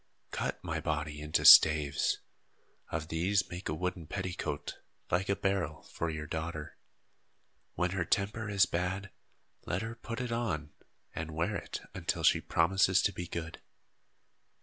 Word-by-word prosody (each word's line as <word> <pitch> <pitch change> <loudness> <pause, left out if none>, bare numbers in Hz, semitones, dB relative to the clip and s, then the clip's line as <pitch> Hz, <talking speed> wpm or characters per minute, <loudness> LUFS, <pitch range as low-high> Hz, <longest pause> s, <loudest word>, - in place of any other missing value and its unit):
Cut - - -3
my - - -2
body 75 -1 -3
into 75 0 0
staves. 75 -2 +7 0.7
Of 80 0 -4
these 90 +4 +1
make 90 0 -5
a 75 - -1
wooden 90 -1 -3
petticoat, 90 -6 -4 0.3
like 95 +3 +1
a 100 - +3
barrel, 95 -7 -1
for 85 - -4
your 75 -1 -4
daughter. 80 -2 -5 1.0
When 90 0 0
her 95 -2 0
temper 105 +4 -1
is 100 -2 +4
bad, 95 +3 -2 0.6
let 90 +4 -1
her 115 0 -4
put 115 0 -6
it 125 -1 -3
on 95 -11 -2 0.4
and 80 -1 -5
wear 85 +6 0
it 85 - -5
until - - -2
she - - +5
promises 95 +2 +3
to 100 - +2
be 90 - -5
good." 80 -2 -6
90 Hz, 150 wpm, -31 LUFS, 80-100 Hz, 1.0 s, staves